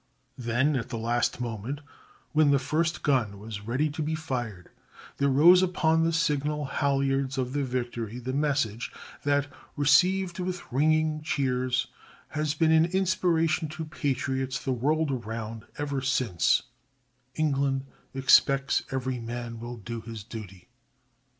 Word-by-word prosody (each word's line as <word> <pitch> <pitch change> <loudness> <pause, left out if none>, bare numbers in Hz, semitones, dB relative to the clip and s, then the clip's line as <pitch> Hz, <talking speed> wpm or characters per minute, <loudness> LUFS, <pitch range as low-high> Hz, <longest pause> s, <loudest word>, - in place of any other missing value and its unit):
Then 125 +5 +1
at 125 - -2
the 115 - -4
last 120 +2 0
moment, 120 +3 -4 0.5
when 155 -1 +4
the 140 - +5
first 160 +5 -1
gun 120 -8 +1
was 105 0 -7
ready 130 +6 +1
to 155 - -4
be 155 +1 -1
fired, 120 - -5 0.5
there 140 0 +2
rose 170 +7 +7
upon 160 -3 +2
the 165 - +2
signal 150 -2 0
halyards 135 -1 0
of 130 -1 -2
the 145 -1 0
Victory 120 -3 -3
the 125 +1 -4
message 140 -6 0 0.3
that, 145 -1 +2 0.3
received 175 +5 +3
with 180 0 -2
ringing 155 +3 +2
cheers, 130 -4 0 0.4
has 155 -1 -1
been 160 0 +3
an 160 0 +6
inspiration 170 -3 +1
to 160 +1 -5
patriots 135 -3 -2
the 135 - -2
world 150 +5 +1
around 115 -2 -5
ever 140 -2 -2
since 130 -8 -1
since— - - +4 0.7
ENGLAND 140 -3 +1 0.3
EXPECTS 135 +1 +4
EVERY 130 -1 -2
MAN 115 0 -5
WILL 120 +1 -6
DO 115 +2 -6
HIS 115 -2 -8
DUTY. 105 -2 -9
135 Hz, 140 wpm, -27 LUFS, 120-155 Hz, 0.7 s, rose